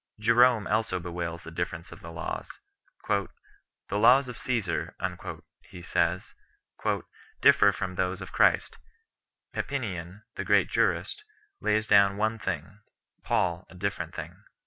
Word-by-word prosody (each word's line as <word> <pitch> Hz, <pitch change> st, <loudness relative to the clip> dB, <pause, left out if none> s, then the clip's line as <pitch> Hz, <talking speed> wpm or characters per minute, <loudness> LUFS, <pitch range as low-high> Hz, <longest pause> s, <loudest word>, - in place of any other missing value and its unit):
Jerome 115 Hz, 0 st, +5 dB
also 110 Hz, -4 st, 0 dB
bewails 85 Hz, -1 st, -5 dB
the 85 Hz, -, -9 dB
difference 85 Hz, 0 st, -4 dB
of 85 Hz, -, -10 dB
the 85 Hz, -, -10 dB
laws. 80 Hz, -, -5 dB, 0.6 s
"The -, -, +1 dB, 0.6 s
laws 125 Hz, +7 st, +5 dB
of 125 Hz, -, -6 dB
Csesar," 100 Hz, -13 st, -2 dB, 0.6 s
he 90 Hz, -, -13 dB
says 85 Hz, +1 st, 0 dB, 0.5 s
3, -, -, 0 dB, 0.4 s
"differ 100 Hz, -, +6 dB
from 95 Hz, -2 st, -4 dB
those 90 Hz, 0 st, -1 dB
of 95 Hz, -, -8 dB
Christ; -, -, +2 dB, 0.7 s
Papinian 100 Hz, -7 st, -4 dB
[the -, -, -4 dB
great -, -, +3 dB
jurist] 425 Hz, -, 0 dB, 0.4 s
lays 110 Hz, +1 st, +1 dB
down 100 Hz, -2 st, +5 dB
one 110 Hz, +2 st, 0 dB
thing, 95 Hz, +1 st, -4 dB, 0.4 s
Paul 85 Hz, -1 st, 0 dB
a -, -, -14 dB
different 90 Hz, -3 st, -3 dB
thing." -, -, -8 dB
95 Hz, 130 wpm, -28 LUFS, 85-110 Hz, 0.7 s, differ